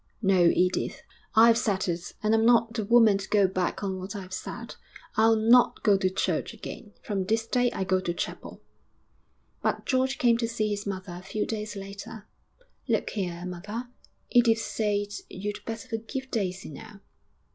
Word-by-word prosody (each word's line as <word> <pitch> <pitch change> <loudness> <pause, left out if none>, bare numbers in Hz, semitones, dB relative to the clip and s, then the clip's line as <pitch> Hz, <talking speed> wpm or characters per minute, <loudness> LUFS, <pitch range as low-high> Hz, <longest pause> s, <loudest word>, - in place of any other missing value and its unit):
No, 190 -3 +4
Edith, 180 0 0 0.3
I've 230 +1 +7
said 205 -6 0
it, 175 0 -4
and 215 +1 +3
I'm 225 0 +4
not 230 -1 +4
the 225 -2 -2
woman 220 -2 +5
to 195 - -7
go 205 -2 +4
back 185 +1 -2
on 190 -1 -2
what 190 +3 -6
I've 185 -2 -7
said - - -6 0.4
I'll 225 +1 +5
not 230 +3 +4
go 205 -2 +5
to 190 -1 +1
church 190 - -1
again. 210 - -9
From 200 -3 -1
this 225 +3 0
day 245 +1 +1
I 190 - -2
go 185 0 +2
to 180 -2 -2
chapel.' 175 - -6 1.0
But - - -1
George 260 0 +1
came 235 -2 +3
to 230 - 0
see 220 -2 -1
his 205 0 -3
mother 190 -2 -5
a - - -12
few 210 +3 -3
days 210 -1 -4
later. 200 +2 -8 0.6
'Look - - 0
here, 180 -4 -3
mother, 205 +7 -6 0.4
Edith 235 -2 +5
says 205 -2 -2
you'd 205 +2 -5
better 225 0 -5
forgive 260 +4 -5
Daisy 190 -6 -2
now.' 210 +6 -11
210 Hz, 175 wpm, -27 LUFS, 190-225 Hz, 1.0 s, I've